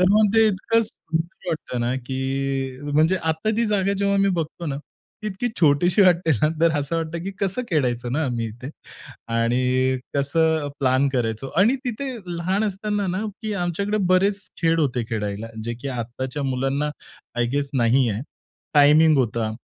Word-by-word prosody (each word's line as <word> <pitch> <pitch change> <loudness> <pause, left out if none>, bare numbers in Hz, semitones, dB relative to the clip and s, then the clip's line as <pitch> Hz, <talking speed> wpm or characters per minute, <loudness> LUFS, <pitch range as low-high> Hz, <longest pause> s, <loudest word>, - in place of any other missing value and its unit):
तर - - +5
मग 210 0 +4
ते 225 0 +6
इतकं 215 +3 +2
सुंदर 170 -4 -5
वाटतं 155 -6 -3
ना, 120 +2 0
की 135 0 -2
म्हणजे 160 +5 +4
आता 160 +3 -1
ती 235 - +2
जागा 200 -2 +1
जेव्हा 200 0 +2
मी 195 - +3
बघतो 165 +1 -4
ना, 140 -2 -2 0.5
ती 215 - -4
इतकी 210 +5 -2
छोटीशी 170 +6 +4
वाटते 175 -3 +4
ना. 150 - +5
तर 165 0 +5
असं 145 +4 -2
वाटतं, 165 0 -3
की 195 - -3
कसं 200 +5 -1
खेळायचो 125 -6 0
ना 150 +5 0
आम्ही 120 -3 -2
इथे 120 +6 -8 0.6
आणि 130 +3 +2 0.2
कसं 155 +2 +1
प्लॅन 130 +1 +3
करायचो. 120 +1 -1
आणि 225 +9 +4
तिथे 255 +3 -3 0.3
लहान 185 +5 0
असताना 205 0 -2
ना 185 +4 -2 0.2
की 215 - -2
आमच्याकडे 200 +5 -1
बरेच 195 +2 +3 0.2
खेळ 165 0 +3
होते 125 -5 0
खेळायला, 105 0 -3 0.2
जे 120 +1 -3
की 140 - -4
आत्ताच्या 130 +3 -4
मुलांना 135 +2 -1 0.5
आय 120 - +2
गेस 140 0 -1
नाही 125 0 +3
आहे. 105 +3 -3 0.5
टायमिंग 150 +2 +6
होता. 115 -3 0
150 Hz, 170 wpm, -23 LUFS, 130-190 Hz, 0.6 s, ते